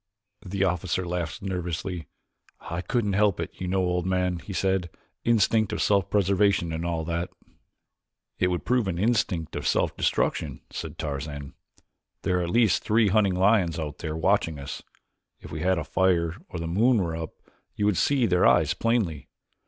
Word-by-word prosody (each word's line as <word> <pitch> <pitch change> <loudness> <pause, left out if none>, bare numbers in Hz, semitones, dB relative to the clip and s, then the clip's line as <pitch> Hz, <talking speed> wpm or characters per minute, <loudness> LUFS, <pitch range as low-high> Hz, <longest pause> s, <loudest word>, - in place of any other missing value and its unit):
The 95 0 -1
officer 90 0 0
laughed 85 0 -3
nervously. 90 -2 -3 0.5
"I 85 +1 -5
couldn't 105 -1 0
help 100 -2 +2
it, 85 - -3
you 90 - -2
know, 95 +1 +1
old 90 0 0
man," 90 -1 0
he 100 - -9
said; 95 -2 0 0.3
"instinct 110 -2 +3
of - - -2
self 100 -3 +2
preservation 100 -3 +2
and 80 +1 -3
all 85 -2 -2
that." 85 +1 -2 1.1
"It 90 - +3
would 90 -1 -2
prove 125 -3 +2
an 90 -3 -2
instinct 100 -6 0
of - - -2
self - - +1
destruction," - - 0
said - - -6
Tarzan. 70 -1 -5 0.7
"There 90 0 +1
are - - 0
at - - -4
least 110 -1 +3
three 110 -1 +3
hunting 100 -2 +3
lions 95 -3 +3
out 75 -3 -5
there 80 -1 -4
watching 80 -2 +1
us. 70 0 -6 0.6
If - - -11
we 75 - -4
had 90 +2 +2
a 85 - -1
fire 85 +1 +1
or - - -6
the 85 - -4
moon 115 +9 +3
were 85 -5 -1
up 80 -1 -6 0.4
you 105 - 0
would 105 -2 +3
see 135 -4 +3
their 90 -4 +4
eyes - - +4
plainly. 110 -11 -1
90 Hz, 175 wpm, -26 LUFS, 85-100 Hz, 1.1 s, their